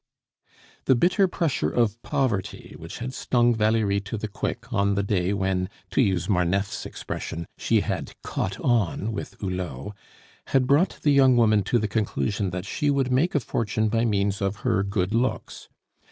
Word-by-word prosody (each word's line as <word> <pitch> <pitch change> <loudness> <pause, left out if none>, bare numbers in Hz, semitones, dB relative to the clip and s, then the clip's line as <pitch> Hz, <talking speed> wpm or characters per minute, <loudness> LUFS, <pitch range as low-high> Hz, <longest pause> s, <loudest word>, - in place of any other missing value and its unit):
The 130 - +5
bitter 185 - +3
pressure 170 -5 0
of 115 -1 0
poverty 120 -9 -2
which 80 - -8
had 125 +2 -5
stung 120 -2 +2
Valerie 110 -2 +2
to 100 +3 -5
the 110 - -4
quick 115 +4 -5
on 100 -2 +2
the 100 - +1
day 95 -2 0
when, 95 -2 0 0.2
to - - +3
use 95 -7 +1
Marneffe's 95 +1 0
expression, 85 +1 -5
she - - +2
had - - -4
"caught 95 +1 -3
on" 115 -3 +1
with 105 - -6
Hulot, 90 -4 -4 0.5
had 130 -1 +2
brought 145 +8 +3
the 145 - +4
young 135 -3 +5
woman 110 -3 +4
to 120 - +2
the 110 -2 0
conclusion 105 -1 -1
that 90 +1 -5
she 145 +8 -1
would 135 -2 +1
make 145 +8 +2
a - - +4
fortune 110 -2 -1
by 115 +1 +1
means 100 -3 0
of 100 0 0
her 95 - +2
good 100 0 -1
looks. 120 +3 -2
105 Hz, 170 wpm, -25 LUFS, 100-125 Hz, 0.5 s, The